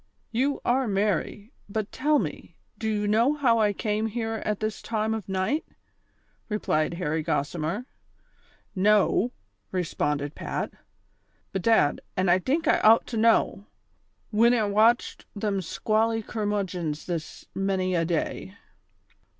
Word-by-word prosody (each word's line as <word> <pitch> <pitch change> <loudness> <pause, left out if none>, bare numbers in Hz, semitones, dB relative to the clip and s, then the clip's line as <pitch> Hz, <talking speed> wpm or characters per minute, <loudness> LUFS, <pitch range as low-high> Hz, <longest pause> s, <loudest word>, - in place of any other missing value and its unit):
" - - -43
You 280 +1 0
are 255 +1 +2
merry; 205 +2 -1 0.2
but 210 0 -3
toll 300 +3 +2
me, - - -4 0.2
do 220 - -1
you 210 -1 0
know 230 +8 +3
liow 240 -5 +3
I 210 -1 +3
came 210 +2 -1
here 225 0 -3
at 210 -1 -1
this 215 0 -3
time 220 -1 -1
of 215 -4 -5
night? 190 +11 0 0.5
" - - -41
replied 170 -6 0
Harry 160 -2 -1
Gossimer. 165 - -2 0.5
" - - -35
Know! 210 +3 +3 0.2
" - - -47
responded 150 -5 -1
Pat. - - -4 0.4
" - - -42
Bedad, 190 -6 +3 0.2
an' 185 0 +2
I 180 +2 +5
tink 295 - 0
I - - +4
out 225 +1 +6
to - - 0
know, 220 -3 +2 0.6
whin 235 +3 +5
I 225 - +2
watched 215 +4 +2
them 200 -1 -1
squally 220 +5 0
curraudgons 195 -8 -2
this 170 -3 -5
many 190 -1 0
a 170 -2 +2
day." 175 +3 -2
210 Hz, 145 wpm, -26 LUFS, 185-225 Hz, 0.6 s, out